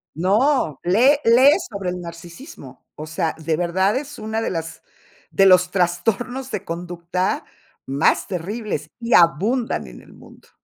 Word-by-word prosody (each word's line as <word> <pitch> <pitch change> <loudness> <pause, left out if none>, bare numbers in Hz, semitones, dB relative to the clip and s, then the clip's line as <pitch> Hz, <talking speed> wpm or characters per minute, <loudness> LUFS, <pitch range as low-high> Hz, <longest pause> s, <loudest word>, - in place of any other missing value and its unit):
No, 200 - +1
lee 235 +11 +4
lee 250 +5 +6 0.2
sobre 200 -4 -4
el 180 0 -6
narcisismo. 170 - -11
O 155 - -7
sea, 160 0 -2
de 160 0 -1
verdad 185 +5 0
es 290 +2 -5
una 220 +1 -3
de - - -2
las 165 -2 -5 0.5
de 195 - +4
los 180 -1 +5
trastornos 225 +9 -1
de - - -5
conducta 175 +2 -3 0.4
más 135 +3 +1
terribles, 190 -3 -4
y 235 0 -2
abundan 205 - +2
en - - -12
el - - -18
mundo. - - -18
185 Hz, 145 wpm, -21 LUFS, 170-230 Hz, 0.5 s, lee